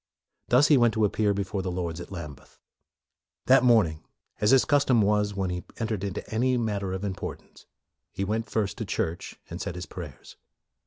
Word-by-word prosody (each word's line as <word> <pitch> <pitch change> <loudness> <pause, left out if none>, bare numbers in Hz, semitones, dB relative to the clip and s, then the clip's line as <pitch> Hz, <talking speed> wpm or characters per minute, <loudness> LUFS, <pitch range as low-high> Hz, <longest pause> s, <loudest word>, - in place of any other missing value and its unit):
Thus 125 +4 +5
he 150 - +7
went 120 -2 +3
to 110 -1 +3
appear 105 0 +1
before 100 0 -2
the 95 - -3
Lords 85 -2 -3
at - - -10
Lambeth. 75 -7 -9 0.9
That 130 0 +6
morning, 105 -11 +3 0.4
as 105 - +2
his 130 -3 +5
cus 145 +2 +3
tom 120 -5 +3
was 105 0 +1
when 95 -2 -1
he 90 0 -4
entered 110 -4 -2
into 100 -2 -4
any 125 +3 +2
matter 105 -5 -2
of 95 +1 -4
importance, 95 -2 -6 0.4
he 95 - -3
went 110 +3 -2
first 105 -3 -1
to - - -2
church 85 +2 -3
and - - -7
said 85 - -4
his 90 0 -5
prayers. 85 -7 -10
100 Hz, 190 wpm, -27 LUFS, 90-115 Hz, 0.9 s, he